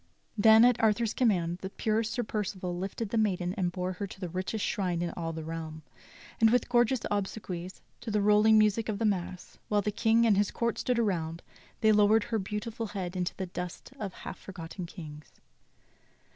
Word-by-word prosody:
Then, 220 Hz, +2 st, +7 dB
at 245 Hz, -1 st, +3 dB
Arthur's 220 Hz, 0 st, +2 dB
command, 180 Hz, -8 st, +1 dB
the 190 Hz, -, -5 dB
pure 215 Hz, +2 st, 0 dB
Sir 235 Hz, +3 st, -2 dB
Percival 190 Hz, -4 st, -3 dB
lifted 195 Hz, +4 st, -4 dB
the 225 Hz, -, +1 dB
maiden 185 Hz, -4 st, 0 dB
and 180 Hz, -3 st, -1 dB
bore 180 Hz, +1 st, -3 dB
her 200 Hz, +2 st, -5 dB
to 190 Hz, -, -12 dB
the 180 Hz, -3 st, -4 dB
richest 185 Hz, +5 st, -2 dB
shrine 180 Hz, -4 st, -1 dB
in 170 Hz, -, -2 dB
all 165 Hz, -1 st, -4 dB
the 160 Hz, -1 st, -6 dB
realm, 160 Hz, -1 st, -6 dB, 0.6 s
and 225 Hz, -, +6 dB
with 245 Hz, +2 st, +2 dB
gorgeous 240 Hz, 0 st, +3 dB
obsequies, 190 Hz, -3 st, -4 dB, 0.2 s
to 235 Hz, -, -7 dB
the 210 Hz, -1 st, +1 dB
rolling 210 Hz, +2 st, +5 dB
music 215 Hz, +1 st, +3 dB
of 210 Hz, -, -1 dB
the 225 Hz, -, -1 dB
mass, 185 Hz, -3 st, -3 dB
while 205 Hz, -1 st, +2 dB
the 210 Hz, -, 0 dB
King 225 Hz, +2 st, +3 dB
and 210 Hz, -4 st, +4 dB
his 205 Hz, 0 st, +2 dB
court 235 Hz, -1 st, -1 dB
stood 250 Hz, -1 st, 0 dB
around, 170 Hz, -7 st, -1 dB, 0.4 s
they 220 Hz, -1 st, +5 dB
lowered 210 Hz, +1 st, +5 dB
her 225 Hz, -2 st, -1 dB
beautiful 215 Hz, +3 st, -4 dB
head 190 Hz, -3 st, -5 dB
into 180 Hz, 0 st, -2 dB
the 190 Hz, -, -2 dB
dust 180 Hz, +6 st, -7 dB
of 195 Hz, -3 st, -5 dB
half -, -, -8 dB
forgotten 175 Hz, -1 st, -7 dB
kings. 150 Hz, -4 st, -10 dB
200 Hz, 195 wpm, -29 LUFS, 180-220 Hz, 0.6 s, Then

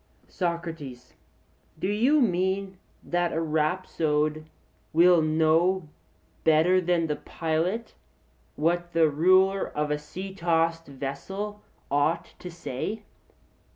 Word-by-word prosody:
SOCRATES: 165 Hz, -8 st, -4 dB, 0.6 s
Do 160 Hz, -, -2 dB
you 245 Hz, +9 st, +3 dB
mean 190 Hz, -2 st, 0 dB, 0.2 s
that 175 Hz, 0 st, 0 dB
a 160 Hz, -, 0 dB
rhapsode 155 Hz, -1 st, 0 dB, 0.5 s
will 170 Hz, +1 st, +6 dB
know 160 Hz, +3 st, +2 dB, 0.5 s
better 160 Hz, +4 st, +4 dB
than 175 Hz, -1 st, +1 dB
the 150 Hz, -2 st, -2 dB
pilot 170 Hz, +8 st, -2 dB, 0.6 s
what 175 Hz, +2 st, 0 dB
the 165 Hz, -1 st, +4 dB
ruler 185 Hz, +5 st, +3 dB
of 150 Hz, 0 st, -2 dB
a 150 Hz, -, 0 dB
sea 185 Hz, +6 st, -8 dB
tossed 165 Hz, -2 st, 0 dB
vessel 190 Hz, +10 st, -5 dB, 0.3 s
ought 145 Hz, +4 st, 0 dB
to 180 Hz, -, -7 dB
say? 170 Hz, -, -5 dB
170 Hz, 105 wpm, -26 LUFS, 155-185 Hz, 0.6 s, will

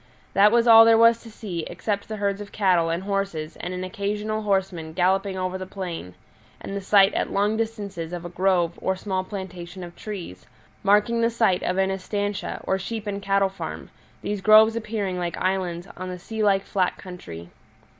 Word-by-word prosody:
That 205 Hz, +2 st, +6 dB
was 235 Hz, 0 st, +3 dB
all 225 Hz, -1 st, +10 dB
there 225 Hz, 0 st, +6 dB
was 230 Hz, 0 st, +5 dB
to 230 Hz, -, -12 dB
see, 210 Hz, -6 st, -6 dB
except 205 Hz, -2 st, -3 dB
the 220 Hz, -, -4 dB
herds 200 Hz, -1 st, -1 dB
of 205 Hz, -, -9 dB
cattle 180 Hz, -5 st, +2 dB
and 170 Hz, +3 st, -2 dB
horses 195 Hz, -6 st, -3 dB
and 180 Hz, -, -5 dB
an 185 Hz, 0 st, -4 dB
occasional 210 Hz, +3 st, -3 dB
horseman 190 Hz, -6 st, -1 dB
galloping 190 Hz, +2 st, +1 dB
over 185 Hz, 0 st, -2 dB
the 185 Hz, -, -6 dB
plain, 175 Hz, -, -6 dB, 0.4 s
and 195 Hz, -, -6 dB
the 200 Hz, -, -3 dB
sight 195 Hz, +1 st, +5 dB
at -, -, -1 dB
long 205 Hz, +2 st, +1 dB
distances 200 Hz, -7 st, -4 dB
of 175 Hz, -1 st, -6 dB
a -, -, -5 dB
grove 175 Hz, -1 st, +1 dB
or 190 Hz, -, 0 dB
small 190 Hz, -1 st, -2 dB
plantation 185 Hz, -2 st, -7 dB
of 175 Hz, 0 st, -10 dB
trees, 180 Hz, -, -8 dB, 0.3 s
marking 210 Hz, +3 st, +3 dB
the 230 Hz, -, +3 dB
site 225 Hz, -6 st, +2 dB
of 180 Hz, -, -1 dB
an 190 Hz, 0 st, +2 dB
estancia, 200 Hz, +1 st, -3 dB
or 190 Hz, -, 0 dB
sheep 215 Hz, +3 st, -5 dB
and 200 Hz, -1 st, -3 dB
cattle 195 Hz, 0 st, +2 dB
farm, 195 Hz, -, -7 dB, 0.3 s
these 205 Hz, -1 st, -3 dB
groves 215 Hz, +2 st, +7 dB
appearing 210 Hz, -5 st, -3 dB
like 175 Hz, -1 st, -3 dB
islands 185 Hz, -1 st, -1 dB
on 185 Hz, 0 st, -6 dB
the 180 Hz, -, -5 dB
sea 220 Hz, +5 st, -5 dB
like 195 Hz, -2 st, +3 dB
flat 185 Hz, -2 st, 0 dB
country. 85 Hz, -, -10 dB
195 Hz, 195 wpm, -24 LUFS, 180-210 Hz, 0.4 s, all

